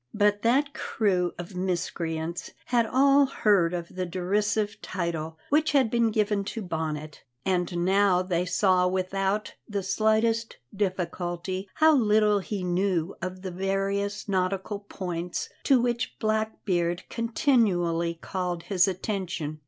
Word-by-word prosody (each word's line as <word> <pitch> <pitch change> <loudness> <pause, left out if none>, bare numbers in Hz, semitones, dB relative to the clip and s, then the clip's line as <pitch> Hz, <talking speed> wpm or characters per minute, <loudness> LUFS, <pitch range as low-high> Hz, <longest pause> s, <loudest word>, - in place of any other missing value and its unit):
But 205 -1 +3
that 275 +5 +2
crew 185 - 0
of 175 +2 -7
miscreants 170 -2 -2 0.2
had 235 -2 +2
all 275 +3 +5
heard 200 -9 +3
of 175 -1 -4
the 185 - -1
derisive 205 +4 -1
title 165 -3 -3
which 305 +2 +2
had 265 -6 +3
been 235 -1 +3
given 210 -2 +1
to 225 +2 -4
Bonnet, 155 -3 -4 0.2
and 175 -2 0
now 190 -1 +3
they 180 -1 0
saw 180 0 +3
without 190 +3 -1 0.2
the 200 -2 -2
slightest 220 +3 +1 0.2
difficulty 185 -1 -2
how 315 0 +6
little 210 -4 +4
he 195 0 -4
knew 180 -1 0
of 185 +1 -5
the 185 - -4
various 195 +3 -1
nautical 195 +1 -1
points 180 -4 -4 0.2
to 270 -2 +5
which 240 +1 -1
Blackbeard 210 -6 -1
continually 195 - +1
called 175 0 -4
his 190 -1 +3
attention. 180 -5 -3
190 Hz, 130 wpm, -27 LUFS, 175-215 Hz, 0.2 s, how